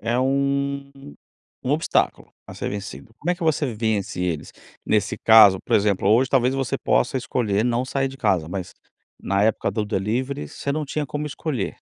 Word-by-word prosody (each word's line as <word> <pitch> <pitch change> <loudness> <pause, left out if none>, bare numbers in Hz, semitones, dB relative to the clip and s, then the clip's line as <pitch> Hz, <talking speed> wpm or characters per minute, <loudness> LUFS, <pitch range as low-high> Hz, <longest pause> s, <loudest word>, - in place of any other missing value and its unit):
é 120 +3 0
um 140 +1 0 0.7
um 125 - -1
obstáculo 155 +3 0
a - - -10
ser - - -4
vencido. 100 - -7
Como 175 - -1
é - - +2
que 175 - -9
você 150 -5 +1
vence 105 -4 -2
eles? 85 -5 -3 0.3
Nesse 105 -1 0
caso, 105 -4 +7
por - - +3
exemplo, 100 -1 +1
hoje 120 +4 +4
talvez 130 0 +2
você 135 -4 -1
possa 125 - +1
escolher 110 -4 0
não 120 +1 +1
sair 135 +1 -1
de 135 - -10
casa, 95 -9 0
mas 90 -1 -5 0.5
na 100 +1 0
época 110 - +1
do 110 -2 -2
delivery 105 - -2
você 140 - -4
não 155 0 -2
tinha 145 +1 -3
como 145 +3 -4
escolher. 140 - -3
120 Hz, 180 wpm, -23 LUFS, 100-140 Hz, 0.7 s, caso